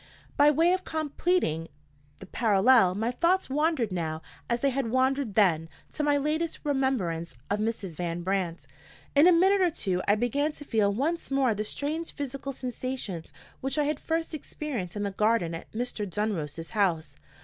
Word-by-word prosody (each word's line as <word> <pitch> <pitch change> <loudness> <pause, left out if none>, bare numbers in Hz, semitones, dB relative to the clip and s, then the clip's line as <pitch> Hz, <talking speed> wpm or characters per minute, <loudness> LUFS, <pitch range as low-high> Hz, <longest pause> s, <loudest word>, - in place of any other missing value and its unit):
By 290 +1 +6
way 330 +4 +4
of 370 0 -1
completing 310 - 0 0.5
the - - -11
parallel, 210 -1 +4
my 225 +4 0
thoughts 345 +4 +1
wandered 295 - +1
now, 160 -3 -3 0.3
as 235 0 0
they 275 - +2
had 260 -3 -1
wandered 260 -2 +1
then, 165 -6 +3 0.2
to - - -3
my 290 -1 +3
latest 310 +3 -1
remembrance 245 - -1 0.2
of 205 - +1
Mrs. 210 -7 -3
Van 175 -1 -3
Brandt. 180 -5 -2 0.5
In 290 +4 +6
a - - +8
minute 380 +3 +4
or 360 - +4
two 190 - -2
I 205 - +5
began 280 +7 0
to 290 - -10
feel 215 -6 +2
once 305 +11 -1
more 270 -4 +2
the 210 +1 -2
strange 305 +9 -3
physical 275 -1 -4
sensations 250 -8 -5 0.3
which 270 +2 -2
I 300 - +3
had 300 +1 -1
first 325 0 -2
experienced 265 - -5
in 205 - -2
the 200 - -1
garden 210 -4 +1
at 165 - -8
Mr. 220 -3 -3
Dunross's 165 -6 -3
house. 165 -9 0
245 Hz, 170 wpm, -28 LUFS, 190-290 Hz, 0.5 s, a